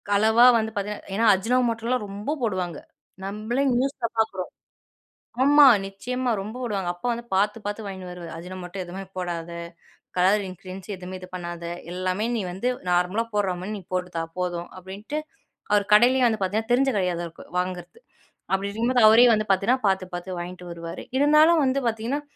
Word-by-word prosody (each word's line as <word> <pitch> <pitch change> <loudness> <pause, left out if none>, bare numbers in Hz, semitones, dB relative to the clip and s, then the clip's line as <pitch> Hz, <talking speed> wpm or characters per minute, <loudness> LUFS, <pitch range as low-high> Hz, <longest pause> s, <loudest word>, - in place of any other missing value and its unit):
அளவா 220 +4 +5
வந்து 220 0 -1
பார்த்திங்கன்னா 205 0 -4
ஏனா 230 +2 +2
அஜுனோ 225 +7 +1
மோட்டலாம் 230 +1 -1
ரொம்ப 205 +8 -4
போடுவாங்க. 185 -8 -1 0.5
நம்மளே 215 +7 -2
நியூஸ்ல 255 -2 0
பாக்குறோம். 190 -5 0 0.9
ஆமா 290 +1 +7 0.2
நிச்சயமா 250 +6 -3
ரொம்ப 215 +4 -7
போடுவாங்க. 200 -6 -2
அப்பா 175 - -7
வந்து 235 0 -5
பாத்து 210 +3 +2
-பாத்து 205 +1 -4
வாங்கினு 190 -2 -7
வருவாரு 175 -1 -8
"அஜு 170 +2 -8
னோ - - -6
மோட்டா 180 +2 -8
எதுவுமே 190 +2 -7
போடாத, 170 -2 -4 0.7
கலர் 195 +3 +3
இன்கிரீடியன்ட்ஸ் 185 +2 -8
எதுவுமே 185 +1 -7
இது 185 - -10
பண்ணாத, 175 -1 -6 0.3
எல்லாமே 185 +4 -1
நீ - - -1
வந்து 195 +7 -2 0.2
நார்மலா 180 +6 +2
போட்ற 195 -3 +1
மாதிரி 210 +3 -4
நீ - - -11
போட்டுத்தா 180 -2 -2 0.2
போதும்." 175 -1 -2
அப்படின்ட்டு, 200 +10 -6 0.5
அவர் 205 -1 +3
கடையிலேயே 250 +4 +6
வந்து 220 -2 0
பார்த்திங்கன்னா 220 +5 -1
தெரிஞ்ச 270 +2 +3
கடையாதா 175 -2 -1 0.3
வாங்குறது. 180 - -5 0.5
அப்படி 195 +1 +1
இருக்கும்போது 235 +2 +2
அவரே 240 +3 +7
வந்து 215 0 0
பார்த்திங்கன்னா, 220 +6 +2
பார்த்து- 190 -1 0
பார்த்து 175 0 -5
வாங்கிட்டு 180 0 -7
வருவாரு, 170 0 -7
இருந்தாலும் 305 +3 +5
வந்து 260 +1 +1
பார்த்திங்கன்னா, 230 +6 -1
200 Hz, 160 wpm, -25 LUFS, 180-230 Hz, 0.9 s, ஆமா